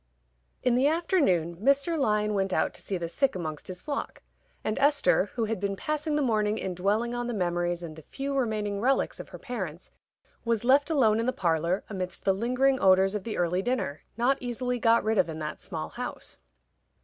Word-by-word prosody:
_ -, -, -44 dB, 0.6 s
In 250 Hz, -, +3 dB
the 255 Hz, +3 st, +4 dB
afternoon 290 Hz, -, +1 dB
Mr. 275 Hz, -, +2 dB
Lyon 210 Hz, -7 st, +1 dB
went 195 Hz, -1 st, 0 dB
out -, -, +1 dB
to -, -, -9 dB
see 195 Hz, -, -3 dB
the 170 Hz, -1 st, -3 dB
sick 265 Hz, +9 st, 0 dB
amongst 155 Hz, -4 st, -5 dB
his 180 Hz, -1 st, -7 dB
flock, 285 Hz, -2 st, -4 dB, 0.4 s
and 215 Hz, -, -1 dB
Esther, 285 Hz, -8 st, +3 dB
who 230 Hz, -2 st, 0 dB
had 220 Hz, -2 st, -2 dB
been 200 Hz, 0 st, -1 dB
passing 305 Hz, -, -2 dB
the 295 Hz, -, +2 dB
morning 215 Hz, -3 st, +1 dB
in 190 Hz, -4 st, -3 dB
dwelling 210 Hz, +7 st, 0 dB
on 240 Hz, 0 st, -2 dB
the 240 Hz, -, -2 dB
memories 175 Hz, -2 st, -1 dB
and 160 Hz, -2 st, -7 dB
the 160 Hz, -, -11 dB
few 275 Hz, -, -5 dB
remaining 210 Hz, -5 st, -1 dB
relics 265 Hz, +3 st, +1 dB
of -, -, -8 dB
her -, -, -9 dB
parents, 190 Hz, -, -6 dB, 0.5 s
was 230 Hz, -2 st, 0 dB
left 280 Hz, +4 st, +4 dB
alone 230 Hz, -9 st, +3 dB
in 230 Hz, -, -1 dB
the -, -, +3 dB
parlor 170 Hz, -3 st, 0 dB
amidst 185 Hz, -3 st, -5 dB
the 195 Hz, -, +4 dB
lingering 255 Hz, +6 st, +1 dB
odors 190 Hz, +1 st, +5 dB
of 210 Hz, -3 st, -4 dB
the 225 Hz, -, -3 dB
early 175 Hz, +1 st, +1 dB
dinner, 195 Hz, -, -2 dB, 0.2 s
not 260 Hz, +3 st, +2 dB
easily 245 Hz, 0 st, -2 dB
got 230 Hz, 0 st, +4 dB
rid 220 Hz, -1 st, +1 dB
of 175 Hz, -3 st, +3 dB
in 160 Hz, -, -5 dB
that 155 Hz, -1 st, -5 dB
small -, -, -5 dB
house. -, -, -7 dB
215 Hz, 210 wpm, -28 LUFS, 185-255 Hz, 0.6 s, odors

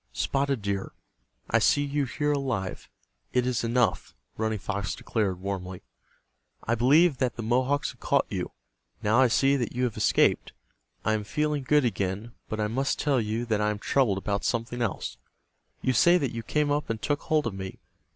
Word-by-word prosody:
"Spotted 135 Hz, -5 st, 0 dB
Deer, 100 Hz, -1 st, -2 dB, 0.6 s
I -, -, +5 dB
see 145 Hz, -, +3 dB
you 145 Hz, 0 st, 0 dB
here 145 Hz, +3 st, -1 dB
alive—it 125 Hz, -1 st, -3 dB
is 125 Hz, -2 st, 0 dB
enough," 115 Hz, -3 st, 0 dB, 0.2 s
Running 110 Hz, 0 st, -1 dB
Fox 100 Hz, -1 st, -3 dB
declared, 100 Hz, -5 st, -1 dB
warmly. 95 Hz, -1 st, -5 dB, 0.8 s
"I 115 Hz, -, 0 dB
believed 140 Hz, +5 st, +4 dB
that 125 Hz, -3 st, 0 dB
the 115 Hz, -, -5 dB
Mohawks 130 Hz, +5 st, +1 dB
had -, -, -20 dB
caught -, -, +2 dB
you. -, -, -4 dB, 0.5 s
Now 110 Hz, +4 st, +3 dB
I 130 Hz, -, +6 dB
see 135 Hz, +4 st, +3 dB
that 120 Hz, -4 st, -2 dB
you 125 Hz, -, 0 dB
have 120 Hz, -3 st, 0 dB
escaped. -, -, +2 dB, 0.5 s
I 110 Hz, -, +3 dB
am 110 Hz, -1 st, -1 dB
feeling 150 Hz, +4 st, -1 dB
good 145 Hz, +1 st, +3 dB
again. 100 Hz, 0 st, -2 dB, 0.2 s
But 110 Hz, -, -3 dB
I 105 Hz, -, +1 dB
must 135 Hz, +6 st, 0 dB
tell 140 Hz, -4 st, +1 dB
you 110 Hz, +2 st, -2 dB
that 110 Hz, -3 st, 0 dB
I 105 Hz, -, +2 dB
am 105 Hz, -, -2 dB
troubled 110 Hz, -1 st, +1 dB
about 100 Hz, +1 st, -2 dB
something 120 Hz, +1 st, -2 dB
else. 115 Hz, -6 st, -2 dB, 0.7 s
You 130 Hz, -, +2 dB
say 175 Hz, +8 st, +5 dB
that 140 Hz, -8 st, -2 dB
you 115 Hz, -, -3 dB
came 150 Hz, +5 st, 0 dB
up 145 Hz, +1 st, -1 dB
and 115 Hz, -1 st, -2 dB
took 145 Hz, +4 st, -1 dB
hold 155 Hz, -3 st, +1 dB
of 115 Hz, -, -2 dB
me. 95 Hz, -1 st, -6 dB
120 Hz, 185 wpm, -27 LUFS, 105-140 Hz, 0.8 s, I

